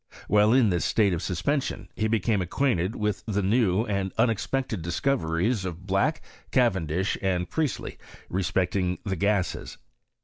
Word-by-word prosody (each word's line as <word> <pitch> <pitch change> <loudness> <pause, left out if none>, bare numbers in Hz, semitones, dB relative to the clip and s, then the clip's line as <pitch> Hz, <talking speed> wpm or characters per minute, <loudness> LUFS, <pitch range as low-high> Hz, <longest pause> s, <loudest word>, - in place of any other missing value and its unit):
While 105 +1 +4
in 125 -3 +5
this 85 -3 0
state 100 -4 +2
of 85 - -2
suspension 105 - -2
he 110 - 0
became 110 -2 +1
acquainted 95 0 0
with 105 -2 -2
the 105 -2 0
new 105 0 +2
and 100 -3 -1
unexpected 115 -1 0
discoveries 90 +1 0
of 90 0 -6
Black, 95 0 +1 0.3
Cavendish, 95 - +1
and 90 -2 0
Priestley, 155 - -2 0.3
respecting 90 0 0
the 95 -2 -1
gases. 100 0 -1
100 Hz, 135 wpm, -26 LUFS, 90-115 Hz, 0.3 s, in